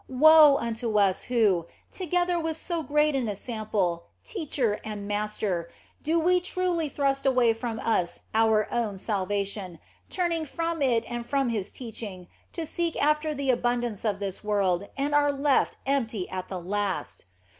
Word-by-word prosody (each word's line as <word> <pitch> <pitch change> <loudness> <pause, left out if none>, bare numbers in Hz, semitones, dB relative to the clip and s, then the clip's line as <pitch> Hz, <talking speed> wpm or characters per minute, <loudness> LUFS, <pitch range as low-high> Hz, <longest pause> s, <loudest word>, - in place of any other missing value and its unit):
Woe 300 +2 +7
unto 230 -1 -2
us, 195 -2 +2
who, 205 -9 +2 0.2
together 355 -1 0
with 325 -1 -2
so 340 0 -2
great 300 +1 +2
an 250 -5 0
ensample, 205 -5 -2 0.2
teacher, 285 - -1
and 210 -2 -6
master, 205 -4 -1 0.3
do 335 +3 +2
truly 360 -3 -1
thrust 275 -1 0
away 250 -3 +4
from 225 0 -4
us 180 -6 0
our 220 -1 +3
own 225 -5 -1
salvation, 200 -2 -2 0.3
turning 340 -3 0
from 330 +1 -3
it 240 -4 +2
and 240 0 -4
from 275 -1 +1
His 210 -4 -2
teaching 210 -7 -7 0.2
to 330 - -4
seek 335 +1 -2
after 300 +1 +2
the 275 -1 +1
abundance 240 -3 -1
of 210 -3 0
this 200 -1 -5
world, 200 -2 0
and 285 +2 -1
are 290 0 +4
left 280 0 +1
empty 230 -8 -1
at 185 0 -4
the 185 - -5
last 190 - -3
235 Hz, 150 wpm, -27 LUFS, 205-300 Hz, 0.3 s, Woe